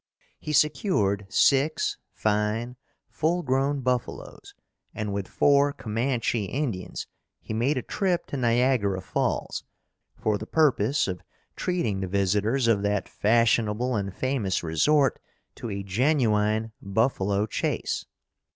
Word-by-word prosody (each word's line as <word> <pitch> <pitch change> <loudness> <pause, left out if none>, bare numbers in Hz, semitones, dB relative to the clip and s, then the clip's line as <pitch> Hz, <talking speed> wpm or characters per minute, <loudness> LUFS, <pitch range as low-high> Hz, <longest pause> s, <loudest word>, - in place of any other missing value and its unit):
He 155 - -5
secured 120 - +1
six 155 - +2 0.2
fine, 110 +3 -1 0.3
full 175 +3 0
grown 135 +1 0
buffalos, 125 -2 -3 0.4
and 105 -2 -3
with 100 -2 -3
four 140 0 +3
Commanche 115 0 -1
Indians, 125 -10 -3 0.3
he - - -7
made 125 +6 +1
a 125 - -2
trip 185 -4 -1
to - - -6
Niagara 120 -5 +2
Falls, 95 - -2 0.5
for 105 -1 0
the 110 - -7
purpose 140 -6 +2
of 90 -2 -4 0.3
treating 170 - -1
the 95 - -2
visitors 105 +6 +1
of 110 -3 +3
that 100 0 0
fashionable 115 +2 +2
and 100 -2 -2
famous 110 -5 -1
resort 135 - +2 0.3
to 120 - -7
a 100 -1 -4
genuine 110 -1 +1
buffalo 100 -1 +1
chase. 110 - -2
115 Hz, 120 wpm, -26 LUFS, 100-135 Hz, 0.5 s, four